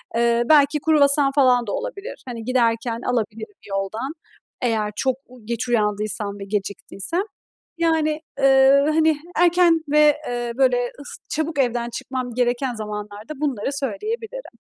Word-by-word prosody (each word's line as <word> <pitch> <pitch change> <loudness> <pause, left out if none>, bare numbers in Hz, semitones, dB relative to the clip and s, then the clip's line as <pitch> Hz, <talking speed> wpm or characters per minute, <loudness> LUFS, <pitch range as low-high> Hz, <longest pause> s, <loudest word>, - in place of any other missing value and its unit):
Eee, 235 0 +2
belki 295 0 +5
kruvasan 285 -2 +4
falan 250 -4 +4
da - - -2
olabilir, - - -6
hani, 235 -3 -6
giderken 230 -2 0
alabilirim 230 - -3
yoldan 195 +8 -3 0.5
eğer 220 -3 0
çok 260 +3 0 0.3
geç 235 +2 -3
uyandıysam 210 -2 -1
ve 195 - -6
geciktiysem. 200 - -3 0.5
Yani, 320 -2 +1 0.2
ııı, 270 +2 +5
hani 315 -1 +3 0.2
erken 345 -1 +4
ve, 300 0 +5
eee, 240 -1 -3
böyle, 245 -2 +2
ıs 285 - -9
çabuk 310 -1 -2
evden 240 -2 0
çıkmam 250 0 -5
gereken 245 +1 0
zamanlarda 210 +2 -6
bunları 275 -2 -1
söyleyebilirim. 445 - -4
255 Hz, 125 wpm, -22 LUFS, 230-300 Hz, 0.5 s, belki